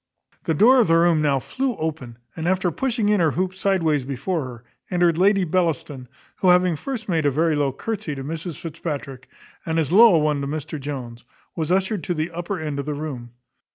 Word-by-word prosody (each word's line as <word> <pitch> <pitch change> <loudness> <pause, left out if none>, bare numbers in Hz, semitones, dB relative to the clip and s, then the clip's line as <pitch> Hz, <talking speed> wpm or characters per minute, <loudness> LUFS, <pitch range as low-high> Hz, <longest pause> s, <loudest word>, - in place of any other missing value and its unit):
The 160 - 0
door 245 - +6
of 235 - +4
the 165 0 +4
room 170 -2 +3
now 145 -2 +2
flew 255 - -2
open, 145 -7 -4 0.2
and, 165 0 -3
after 185 -1 +1
pushing 235 - -1
in 210 -1 +3
her 165 -2 +3
hoop 185 +5 -1
sideways 175 -7 +1
before 140 +5 -3
her, 120 -2 -10 0.3
entered 175 -2 +2
Lady 195 +1 +4
Bellaston, 155 -7 -1 0.3
who 185 - +2
having 180 -1 +4
first 235 - -5
made 165 -5 +1
a - - +5
very 155 +3 +1
low 145 -2 +1
courtesy 205 - -4
to 135 - -6
Mrs 165 +2 -5
Fitzpatrick, 145 -5 -6 0.3
and 160 0 -2
as 160 -2 0
low 220 0 +7
a - - +5
one 150 -2 +1
to 140 - -3
Mr 155 +1 -5
Jones, 130 -4 -6 0.3
was 160 -1 -2
ushered 190 0 0
to 175 - -1
the 155 +2 -2
upper 175 +3 -4
end 150 -3 -4
of 140 - -5
the 150 - -2
room. 130 -6 -6
160 Hz, 210 wpm, -22 LUFS, 145-185 Hz, 0.3 s, low